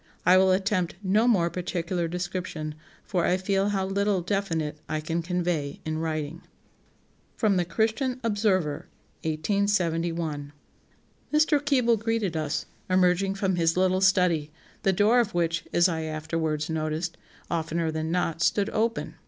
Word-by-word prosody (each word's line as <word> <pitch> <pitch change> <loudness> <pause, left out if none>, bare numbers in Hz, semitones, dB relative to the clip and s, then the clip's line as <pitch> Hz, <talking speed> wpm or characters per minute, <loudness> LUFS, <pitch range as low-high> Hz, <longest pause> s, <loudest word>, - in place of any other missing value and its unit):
I 180 - +7
will 190 0 +5
attempt 185 -2 0
no 210 +5 +3
more 175 -8 +3
particular 175 -1 -2
description, 175 -3 -4 0.3
for 180 -3 -1
I 180 - +2
feel 195 +1 +1
how 195 -2 0
little 200 0 +1
definite 165 -5 -2
I 155 - -1
can 165 +2 -2
convey 170 -4 -2
in 155 0 -2
writing." 160 0 -3 1.0
[Sidenote: 210 -4 +2
The 175 - +1
Christian 245 +4 +1
Observer, 205 -9 0 0.4
1871.] 165 -3 -1 0.8
"Mr. 300 -1 +3
Keble 250 -6 +3
greeted 225 -5 -1
us, 155 -1 -2 0.2
emerging 185 +1 +3
from 195 -2 0
his 165 0 +2
little 185 0 +2
study, 180 -5 +3 0.3
the 195 - +3
door 210 +6 +4
of 220 -6 0
which, 170 -1 0
as 175 +1 +4
I 165 -3 -2
afterwards 155 0 -2
noticed, 160 +1 -2 0.4
oftener 165 0 -1
than 160 0 -3
not, 165 -2 -1
stood 200 +5 +2
open.... 230 +1 -1
180 Hz, 140 wpm, -26 LUFS, 160-200 Hz, 1.0 s, I